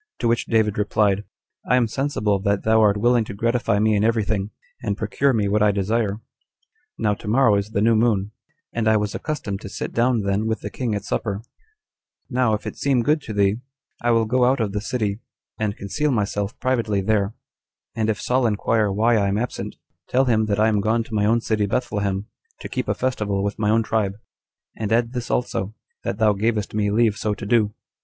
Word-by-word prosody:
To 120 Hz, -, -1 dB
which 115 Hz, 0 st, +1 dB
David 110 Hz, -3 st, +1 dB
replied, 105 Hz, -1 st, +1 dB, 0.4 s
"I 125 Hz, -, +5 dB
am 125 Hz, -2 st, +3 dB
sensible 110 Hz, -5 st, 0 dB
that 100 Hz, 0 st, 0 dB
thou 110 Hz, 0 st, +4 dB
art 105 Hz, -1 st, +4 dB
willing 120 Hz, +2 st, +3 dB
to 100 Hz, -, -7 dB
gratify 115 Hz, 0 st, +1 dB
me 110 Hz, +1 st, +3 dB
in 100 Hz, -, +2 dB
every 115 Hz, -1 st, +2 dB
thing, 100 Hz, -1 st, -1 dB, 0.3 s
and 105 Hz, -4 st, -2 dB
procure 125 Hz, +6 st, +1 dB
me 110 Hz, -5 st, +1 dB
what 105 Hz, +1 st, +1 dB
I 105 Hz, -, +5 dB
desire. 105 Hz, +1 st, 0 dB, 0.8 s
Now 105 Hz, -2 st, +1 dB
tomorrow 115 Hz, +3 st, +2 dB
is 100 Hz, +1 st, 0 dB
the 105 Hz, -2 st, 0 dB
new 115 Hz, 0 st, +4 dB
moon, 105 Hz, -3 st, +1 dB, 0.4 s
and 115 Hz, -1 st, -1 dB
I 110 Hz, 0 st, +5 dB
was 105 Hz, -1 st, -2 dB
accustomed 110 Hz, -10 st, -4 dB
to 100 Hz, -, -7 dB
sit -, -, -5 dB
down 120 Hz, -1 st, +2 dB
then 100 Hz, +2 st, 0 dB
with 110 Hz, 0 st, -1 dB
the -, -, -6 dB
king 120 Hz, -5 st, -2 dB
at 100 Hz, -, -4 dB
supper: 105 Hz, 0 st, -2 dB, 0.9 s
now, 125 Hz, -3 st, +2 dB
if 105 Hz, -, -8 dB
it -, -, -5 dB
seem 135 Hz, -4 st, +1 dB
good 150 Hz, +4 st, +2 dB
to 110 Hz, -, -7 dB
thee, 100 Hz, 0 st, +2 dB, 0.4 s
I 120 Hz, -, +1 dB
will 115 Hz, -1 st, +3 dB
go 125 Hz, +3 st, +2 dB
out 130 Hz, +2 st, +2 dB
of 110 Hz, -3 st, 0 dB
the 105 Hz, +1 st, -2 dB
city, 110 Hz, -3 st, -2 dB, 0.4 s
and 105 Hz, -1 st, -1 dB
conceal 150 Hz, +10 st, -1 dB
myself 105 Hz, -4 st, -1 dB
privately 115 Hz, -6 st, 0 dB
there; 100 Hz, +1 st, 0 dB, 0.6 s
and 110 Hz, -1 st, 0 dB
if 105 Hz, -, 0 dB
Saul 125 Hz, -1 st, +1 dB
inquire 105 Hz, 0 st, +1 dB
why 110 Hz, +4 st, +3 dB
I 100 Hz, -2 st, +2 dB
am 100 Hz, +1 st, 0 dB
absent, 120 Hz, +2 st, -4 dB, 0.3 s
tell 130 Hz, +2 st, +3 dB
him 110 Hz, -3 st, +2 dB
that 105 Hz, -1 st, 0 dB
I 110 Hz, -, +4 dB
am 105 Hz, -2 st, +2 dB
gone 115 Hz, +3 st, +1 dB
to 115 Hz, -, -12 dB
my 105 Hz, -1 st, +2 dB
own 115 Hz, +2 st, +3 dB
city 105 Hz, -2 st, 0 dB
Bethlehem, 100 Hz, -3 st, -1 dB, 0.4 s
to -, -, -5 dB
keep -, -, -3 dB
a -, -, 0 dB
festival 105 Hz, -6 st, -1 dB
with 100 Hz, +1 st, -3 dB
my 105 Hz, -1 st, +1 dB
own 115 Hz, +1 st, +3 dB
tribe; 105 Hz, -3 st, 0 dB, 0.6 s
and 110 Hz, -2 st, -3 dB
add 115 Hz, +1 st, +2 dB
this 125 Hz, -2 st, -4 dB
also, 110 Hz, -4 st, -1 dB, 0.3 s
that -, -, -2 dB
thou 110 Hz, -2 st, +4 dB
gavest 105 Hz, +1 st, -1 dB
me 105 Hz, -1 st, +1 dB
leave 110 Hz, 0 st, +2 dB
so 105 Hz, 0 st, -1 dB
to 105 Hz, -, -7 dB
do. 105 Hz, -1 st, +2 dB
110 Hz, 215 wpm, -22 LUFS, 100-115 Hz, 0.9 s, I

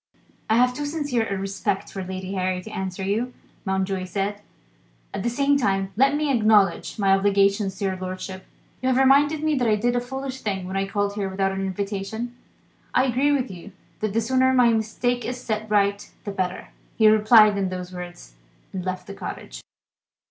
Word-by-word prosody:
"I 220 Hz, -, +4 dB
have 250 Hz, +1 st, +4 dB
too 290 Hz, +3 st, -3 dB
sincere 290 Hz, -7 st, -1 dB
a 200 Hz, -, -1 dB
respect 195 Hz, 0 st, -2 dB
for 195 Hz, -, -5 dB
Lady 185 Hz, +1 st, -5 dB
Harry 185 Hz, -1 st, -1 dB
to 220 Hz, -, -9 dB
answer 190 Hz, -1 st, -4 dB
you," 225 Hz, +6 st, -1 dB, 0.3 s
Mountjoy 190 Hz, -1 st, -1 dB
said. 200 Hz, +2 st, -3 dB, 0.7 s
"At -, -, -3 dB
the 235 Hz, -, 0 dB
same 280 Hz, +3 st, +2 dB
time, 195 Hz, -4 st, 0 dB
let 270 Hz, +5 st, +4 dB
me 295 Hz, -1 st, +1 dB
acknowledge 215 Hz, -5 st, +3 dB
my 195 Hz, -2 st, +3 dB
obligations 195 Hz, 0 st, +2 dB
to 200 Hz, -, -2 dB
your 190 Hz, -1 st, 0 dB
lordship. 185 Hz, 0 st, -6 dB, 0.3 s
You 255 Hz, -, +1 dB
have 255 Hz, -, +2 dB
reminded 285 Hz, +3 st, +4 dB
me 310 Hz, -1 st, +2 dB
that 245 Hz, -, +1 dB
I 215 Hz, -, +4 dB
did 240 Hz, +3 st, 0 dB
a 245 Hz, -, +1 dB
foolish 265 Hz, +1 st, -5 dB
thing 195 Hz, -3 st, -2 dB
when 190 Hz, -, -5 dB
I 195 Hz, 0 st, 0 dB
called 205 Hz, 0 st, -1 dB
here 200 Hz, -2 st, -2 dB
without 195 Hz, 0 st, 0 dB
an 195 Hz, 0 st, -3 dB
invitation. 200 Hz, +5 st, -4 dB, 0.6 s
I 255 Hz, -, +5 dB
agree 265 Hz, +3 st, +2 dB
with 265 Hz, -6 st, 0 dB
you 185 Hz, +2 st, -10 dB, 0.3 s
that 215 Hz, -2 st, -2 dB
the 230 Hz, -, +2 dB
sooner 260 Hz, +3 st, +3 dB
my 245 Hz, -2 st, +6 dB
mistake 230 Hz, +2 st, 0 dB
is 250 Hz, +1 st, -4 dB
set 215 Hz, -3 st, -3 dB
right 200 Hz, -1 st, +1 dB
the 205 Hz, -, -4 dB
better." 185 Hz, -2 st, -3 dB, 0.3 s
He 220 Hz, -, +5 dB
replied 215 Hz, 0 st, +6 dB
in 195 Hz, -2 st, 0 dB
those 180 Hz, 0 st, -6 dB
words, 175 Hz, -, -9 dB, 0.4 s
and 185 Hz, -2 st, -4 dB
left 185 Hz, 0 st, -4 dB
the 200 Hz, -, -8 dB
cottage. -, -, -7 dB
205 Hz, 195 wpm, -24 LUFS, 195-245 Hz, 0.7 s, my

